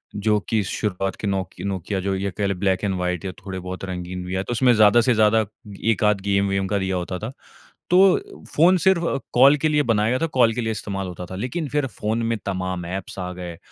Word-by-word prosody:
जो 105 +1 +2
कि 110 -2 +2
शुरुआत 95 -2 -2
के 105 - -5
नोकि 95 -3 -3
नोकिया, 95 0 -2
जो 95 +1 -1
ये 95 0 -2
कह 105 - 0
लें, 100 - -2
ब्लैक 95 0 +1
एंड 100 -2 0
व्हाइट 90 +1 -2
या 95 - -2
थोड़े 95 -1 -5
बहुत 90 +1 -6
रंगीन 90 0 -5
भी, 90 +1 -4
या 95 - -1
तो - - -6
उसमें 120 +1 +4
ज़्यादा 110 +1 +6
से 125 +2 +3
ज़्यादा 110 0 +3 0.5
एक-आध 105 -1 +2
गेम 100 0 +1
वेम 95 0 0
का 100 - 0
दिया 95 0 -1
होता 90 0 -3
था। 110 +6 -5 0.6
तो 195 - +3
फ़ोन 175 +4 +5
सिर्फ़ 185 -3 +4 0.3
कॉल 135 +4 +6
के 155 +2 +1
लिए 150 -1 +2
बनाया 105 0 +2
गया 125 +2 +1
था, 165 - 0
कॉल 125 -6 +3
के 120 - -2
लिए 110 - -1
इस्तेमाल 95 -2 -4
होता 90 0 -7
था। - - -5
लेकिन 130 - -3
फिर 145 0 0
फ़ोन 110 +2 -2
में 115 - 0
तमाम 95 -2 -3
एप्स 95 +2 -6
आ 90 0 -4
गए 90 -2 -7
100 Hz, 235 wpm, -23 LUFS, 95-115 Hz, 0.6 s, ज़्यादा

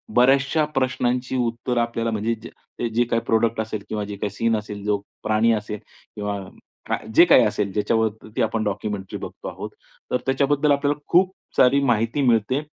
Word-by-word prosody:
बऱ्याचशा 135 +5 +4
प्रश्नांची 130 -1 0
उत्तरं 120 0 0
आपल्याला 115 -1 -1
म्हणजे 110 +2 0
जे 120 0 -7
जे 120 - +4
काही 115 0 0
प्रॉडक्ट 115 0 +1
असेल 110 -2 -5
किंवा 105 -1 -2
जे 100 0 -6
काही 105 0 -2
सीन 115 +2 +1
असेल, 105 -1 -7
जो 105 -1 +2 0.3
प्राणी 110 +2 +3
असेल, 105 -1 -3 0.4
किंवा 105 -1 -3 0.5
का - - +1 0.2
जे 170 - +9
काही 145 -8 +6
असेल 100 -1 -1
ज्याच्यावरती 110 +1 -1
आपण 110 0 0
डॉक्युमेंटरी 105 -1 -3
बघतो - - -8
आहोत - - -6 0.4
तर 125 - +3
त्याच्याबद्दल 140 +2 +2
आपल्याला 145 +1 +1
खूप 185 +2 +5 0.3
सारी 130 +2 +5
माहिती 115 +2 +1
मिळते 125 +2 +2
115 Hz, 165 wpm, -23 LUFS, 105-130 Hz, 0.5 s, जे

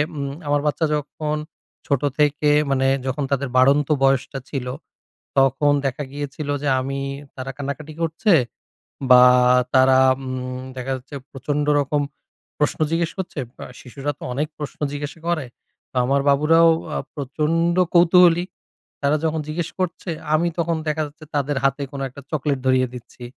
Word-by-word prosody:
উম 140 -1 -3 0.2
আমার 145 0 +2
বাচ্চা 155 +2 +1
যখন 150 +1 -3 0.5
ছোট 140 -3 +1 0.2
থেকে 150 0 +3 0.2
মানে 135 0 +2 0.2
যখন 135 +3 -1
তাদের 140 -1 0
বাড়ন্ত 140 +2 +4 0.2
বয়সটা 135 0 +1
ছিল, 130 -3 -4 0.7
তখন 135 +2 +4
দেখা 135 +2 -2
গিয়েছিল 145 +1 -5
যে 145 - -1
আমি 135 +1 -3 0.4
তারা 135 0 -5
কান্নাকাটি 145 +2 -5
করছে 165 +5 +2 0.8
বা 125 0 +9 0.5
তারা 130 0 +6 0.3
উম 130 0 -5
দেখা 130 +1 -4
যাচ্ছে 135 +3 -11 0.2
প্রচন্ড 145 +2 -2
রকম 145 +1 0 0.6
প্রশ্ন 150 - 0
জিজ্ঞেস 165 0 0
করছে, 175 -5 -4 0.2
বা - - -9 0.2
শিশুরা 135 +3 -4
তো - - -10
অনেক 150 +4 -1
প্রশ্ন 145 - -6
জিজ্ঞাসা 145 +2 -6
করে, 160 -6 0 0.5
তো - - -26
আমার 140 +1 +2
বাবুরাও 160 +4 +5 0.3
আ - - 0 0.2
প্রচন্ড 155 +5 0 0.2
কৌতূহলী। 175 0 +6 0.6
তারা 145 +1 +2
যখন 160 0 0
জিজ্ঞেস 165 +1 -3
করছে 185 0 -3 0.3
আমি 170 +2 +2
তখন 170 0 +1
দেখা 155 +1 0
যাচ্ছে 155 +2 -15
তাদের 145 0 0
হাতে 135 +1 +1
কোন 140 - -6
একটা 140 +3 -12
চকোলেট 145 -2 -1
ধরিয়ে 130 0 +3
দিচ্ছি 125 0 -11
145 Hz, 150 wpm, -22 LUFS, 135-155 Hz, 0.8 s, বা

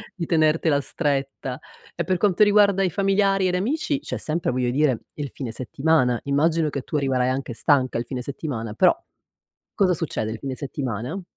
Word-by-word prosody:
di 175 - -3
tenertela 155 -2 +2
stretta. 135 -4 -2 0.4
E 170 - -1
per 185 +3 0
quanto 195 0 +1
riguarda 205 -2 +4
i 185 - +2
familiari 195 +1 +2
ed 180 - 0
amici 280 +9 -1
c'è - - -5
sempre, 165 +2 -1
voglio 125 -1 0
dire, 135 -3 +1
il 145 -2 -5
fine 130 -5 -6
settimana. 130 0 +1
Immagino 155 +3 +1
che 140 -2 -4
tu 155 - -7
arriverai 130 -3 +1
anche 130 -1 -3
stanca 130 -1 +2
il 120 - -3
fine 125 0 -5
settimana, 125 -6 -5
però 185 - +4 0.8
cosa 190 -3 +3
succede 130 -9 -3
il 110 - -6
fine 135 -1 -4
settimana? 130 - -4
145 Hz, 175 wpm, -23 LUFS, 130-180 Hz, 0.8 s, riguarda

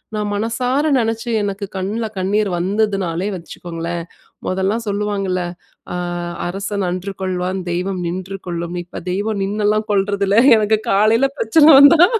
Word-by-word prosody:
நான் 210 -1 -2
மனசார 250 +7 0
நினைச்சு 225 +1 -2
எனக்கு 200 0 -3
கண்ணுல 205 +5 -2
கண்ணீர் 200 +2 +1
வந்ததுனாலே 195 -1 0
வச்சுக்கோங்களேன்! 170 0 -6 0.4
மொதல்லாம் 190 +5 0
சொல்லுவாங்கல்ல, 200 -2 -1 0.5
அ - - -3 0.5
"அரசன் 200 +2 -3
அன்று 185 +2 -3
கொல்வான், 185 0 -2
தெய்வம் 180 +2 -2
நின்று 185 +3 -4
கொல்லும்" 170 0 -4
இப்ப 180 - -9
தெய்வம் 205 +2 -1
நின்னலாம் 210 +2 0
கொல்றது 200 0 +1
இல்ல. 200 +3 +3 0.2
எனக்கு 215 0 +2
காலையில 220 +6 +4
பிரச்சனை 295 +8 +4
வந்தா 305 +5 +8
200 Hz, 130 wpm, -19 LUFS, 185-215 Hz, 0.5 s, வந்தா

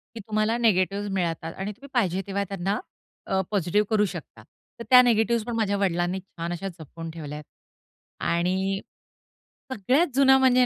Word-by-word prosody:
की - - -6
तुम्हाला 215 +1 +1
निगेटिव्हज 200 -3 +2
मिळतात 165 -3 -2
आणि 195 +2 -4
तुम्ही 260 +7 -13
पाहिजे 190 -7 +1
तेव्हा 200 +1 -1
त्यांना 195 0 -2 0.5
अ, 190 0 +1
पॉझिटिव्ह 205 +2 +2
करू 210 -1 +3
शकता. 140 - -9 0.4
तर - - -5
त्या 250 -1 +10
निगेटिव्हज 230 -1 +2
पण 240 - -4
माझ्या 205 -3 +1
वडिलांनी 180 -1 0
छान 175 -2 -7
अशा 175 +3 -4
जपून 165 +1 -8
ठेवल्यात. 150 -2 -7 0.8
आणि 185 +3 0 0.9
सगळ्यात 260 - +2
जुना 265 -1 +6
म्हणजे 255 -1 +5
195 Hz, 150 wpm, -25 LUFS, 175-225 Hz, 0.9 s, त्या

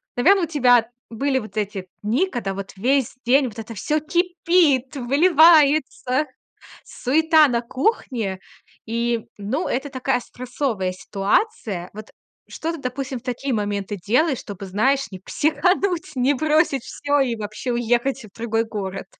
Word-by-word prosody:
наверно, 365 +9 +4
у - - +2
тебя 245 -7 +3 0.2
были 265 +4 0
вот 215 -3 -10
эти 200 -3 -3 0.2
дни, 245 - +1
когда 230 - -3
вот 195 0 -7
весь 260 +4 +1
день 265 +3 +4
вот 225 -1 -9
это 225 +1 -7
всё 300 +9 0
кипит, 335 -5 +1
выливается, 295 -1 +4 0.6
суета 315 +3 +3
на 240 -3 0
кухне. 235 - -2 0.5
И, 235 0 -1
ну, 225 - -2
это 270 +3 -2
такая 260 -1 -1
стрессовая 245 -6 -3
ситуация. 195 - -1
Вот 215 0 -10 0.4
что 325 - -4
ты, 330 - -7
допустим, 260 0 -4
в - - -28
такие 255 +1 -3
моменты 205 -2 -2
делаешь, 250 - +1
чтобы, 200 -2 -8
знаешь, 255 +7 0
не 185 - -8
психануть, 330 - 0
не 260 +2 +2
бросить 300 -2 +1
всё 290 0 -1
и 255 -4 +1
вообще 215 +4 -4
уехать 240 +1 0
в 200 - -18
другой 225 0 0
город? 195 -3 -5
250 Hz, 145 wpm, -22 LUFS, 215-295 Hz, 0.6 s, наверно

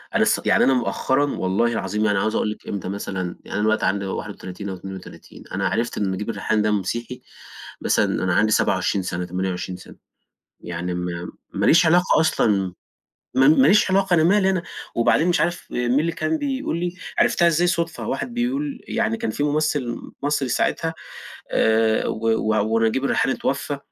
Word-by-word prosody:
أنا - - +4
ص - - +2
يعني - - +4
أنا 135 - +4
مؤخرًا 130 +3 +1
والله 95 +5 +1
العظيم 105 -1 -1
يعني 105 -2 +2
عاوز 110 +2 0
أقول 105 - 0
لكِ - - -10
إمتى 100 -2 -4
مثلًا 95 -2 -4
يعني - - -7
أنا 105 - 0
دلوقتي 110 0 +2
عندي 100 0 0
31 100 0 -6
أو 95 - -4
32، 95 0 -10
أنا - - 0
عرفت 115 +1 -2
إن 100 -2 0
نجيب 95 +3 -4
الريحاني 110 -1 0
ده 105 0 +1
مسيحي 115 +5 -3 0.6
مثلًا - - +1
أنا 90 -1 +1
عندي 110 +1 +3
27 95 -1 +1
سنة، 90 0 -3
28 90 0 -3
سنة، - - -14 0.7
يعني 90 +1 -4
م 90 0 -4 0.2
ما - - 0
ليش 170 +2 +6
علاقة 175 +2 +4
أصلًا، 100 - +1 0.6
م 130 - +3 0.2
ماليش 185 +7 +5
علاقة، 190 -1 +2
أنا 160 - +3
مالي 190 +3 +4
أنا، 185 -3 0 0.3
وبعدين 120 +8 +3
مش 175 - +2
عارف 175 +1 -1
مين 125 +2 +1
اللي 165 +1 -1
كان 160 -1 -1
بيقول 270 - -2
لي 175 +1 -3 0.2
عرفتها 170 - +4
إزاي 170 +1 +3
صدفة، 170 -2 -2
واحد 245 - -3
بيقول 265 +4 -2
يعني 110 +1 0
كان 110 - -2
في 145 - -2
ممثل 145 -4 0 0.3
مصري 145 -2 0
ساعتها 160 +6 0 0.6
آآ، 110 0 +2
و 115 +1 -2
و 110 0 +1
ونجيب 115 +4 +1
الريحاني 135 -1 +1
اتوفى، 140 +1 -2
115 Hz, 180 wpm, -22 LUFS, 100-160 Hz, 0.7 s, ليش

